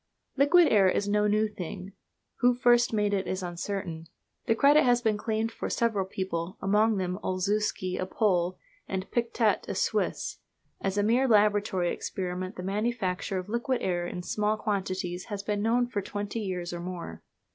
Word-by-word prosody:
Liquid 305 +5 +6
air 195 -3 +5
is 200 +2 0
no 210 0 +2
new 215 +1 +2
thing. 195 -1 -7 0.4
Who 245 0 +4
first 240 -1 +4
made 210 -2 +1
it 195 -1 0
is 185 0 -2
uncertain. 175 -2 -4 0.4
The 225 - +3
credit 290 +5 +6
has 245 -1 +4
been 220 -3 +1
claimed 220 +1 -1
for - - -5
several 225 -5 +1
people, 185 -2 -4
among 210 +2 +2
them 185 0 -2
Olzewski, 185 0 -1
a 185 - -2
Pole, 185 -4 +1 0.3
and 190 -1 -3
Pictet, 230 -2 +1
a - - -2
Swiss. - - -1 0.4
As 195 +1 -1
a 205 - +3
mere 240 +5 +3
laboratory 205 -5 +3
experiment 185 +1 -4
the 180 - -6
manufacture 195 -2 -1
of 185 - -4
liquid 235 +3 -1
air 175 -1 0
in 180 0 -5
small 210 +3 0
quantities 185 -4 -2
has 205 -3 -5
been 205 0 -1
known 235 +3 +2
for 225 -4 -3
twenty 205 +3 -4
years 180 -4 -3
or 175 - -4
more. 170 - -6
205 Hz, 170 wpm, -28 LUFS, 185-220 Hz, 0.4 s, Liquid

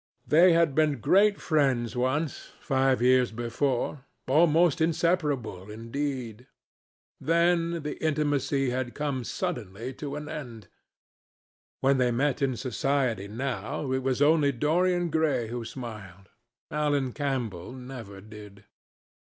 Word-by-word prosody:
They 170 +3 +6
had 165 -3 +3
been 150 -2 +2
great 200 - +4
friends 130 -7 +1
once, 130 +5 -2
five 135 -2 +1
years 125 -1 +4
before—almost 140 +7 +1
inseparable, 150 - 0
indeed. 120 +1 -5 0.7
Then 170 0 +1
the 150 - -5
intimacy 145 -3 +1
had 125 -1 -3
come 140 -4 -2
suddenly 120 - -4
to 145 -1 -4
an 150 0 -6
end. 120 - -8 1.1
When 135 0 +3
they 125 -1 +3
met 140 +4 0
in 130 -3 0
society 130 -5 -1
now, 130 +4 -4
it 130 0 0
was 130 +1 +1
only 150 -1 +4
Dorian 175 +5 +1
Gray 150 -8 +1
who 120 0 -4
smiled: 110 -6 -9 0.4
Alan 145 -4 0
Campbell 125 - -3
never 125 -6 -9
did. 105 -1 -13
135 Hz, 115 wpm, -27 LUFS, 120-150 Hz, 1.1 s, They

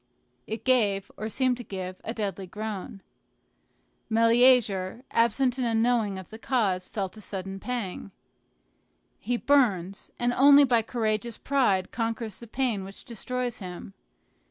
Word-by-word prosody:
It 220 0 -5
gave, 210 -7 +2
or 215 +1 -4
seemed 255 +2 +1
to 245 - -7
give, 185 -3 -6
a - - -4
deadly 200 -4 -4
groan. 205 -1 -6 1.1
Meleager, 230 -2 +3
absent 240 +3 +2
and 250 - +1
unknowing 225 -3 +1
of 190 -2 -10
the 220 - -9
cause, 205 -8 0
felt 195 -1 -4
a - - -9
sudden 195 -1 -6
pang. 220 -5 -4 1.1
He 245 - -1
burns, 200 -10 +1
and 245 0 +1
only 280 +3 +7
by 245 -4 +3
courageous 220 0 -2
pride 220 -10 +1
conquers 225 -2 -3
the 235 - -12
pain 235 -4 -1
which 195 +1 -11
destroys 245 +1 -4
him. 185 0 -8
225 Hz, 135 wpm, -27 LUFS, 195-245 Hz, 1.1 s, only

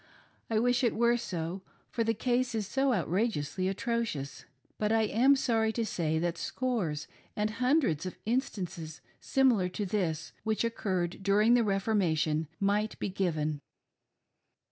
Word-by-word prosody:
I 225 - +1
wish 245 +2 +2
it 235 - +2
were 235 +1 +3
so, 180 -5 -4 0.3
for 235 - 0
the 225 0 +1
case 245 +2 0
is 215 -2 -1
so 270 +6 +1
outrageously 185 - 0
atrocious; 205 - -2 0.3
but 210 0 +1
I 225 0 +3
am 245 +6 +4
sorry 225 -4 +1
to 230 0 -1
say 160 -6 -1
that 170 +1 -1
scores 205 - -2 0.3
and 210 +1 0
hundreds 250 - +1
of 185 - -7
instances 185 - -3 0.2
similar 245 -9 +2
to 205 +3 -3
this, 175 -6 -2
which 220 0 0
occurred 190 -6 -2
during 205 +4 +4
the 240 -1 +5
Reformation, 180 -7 +1
might 205 +2 +1
be - - -2
given. 155 -6 -1
210 Hz, 145 wpm, -30 LUFS, 175-235 Hz, 0.3 s, the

